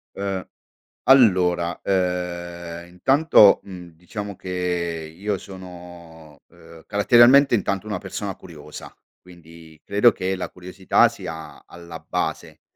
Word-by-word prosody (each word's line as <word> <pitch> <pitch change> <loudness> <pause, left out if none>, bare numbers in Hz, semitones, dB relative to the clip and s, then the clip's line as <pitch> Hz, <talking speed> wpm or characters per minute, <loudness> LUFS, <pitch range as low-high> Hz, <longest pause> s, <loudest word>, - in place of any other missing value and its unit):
Uhm, 100 -2 -4 0.6
allora, 90 -9 +3
uhm, 85 -2 -3
intanto, 110 - +4
mhmm, 90 -3 -11
diciamo 100 +4 -8
che 85 -3 -4
io 100 +2 -3
sono, 85 -5 -13
uhm, 80 -1 -17
caratterialmente 120 +6 +5
intanto 100 -1 -1
una 105 -4 -4
persona 100 0 -6
curiosa, 75 -4 -12 0.3
quindi 85 -3 -16
credo 105 +4 +4
che 95 +1 -3
la 90 - -5
curiosità 90 +1 +1
sia 80 0 -9
alla 85 -1 -11
base - - -5
90 Hz, 110 wpm, -22 LUFS, 85-100 Hz, 0.6 s, caratterialmente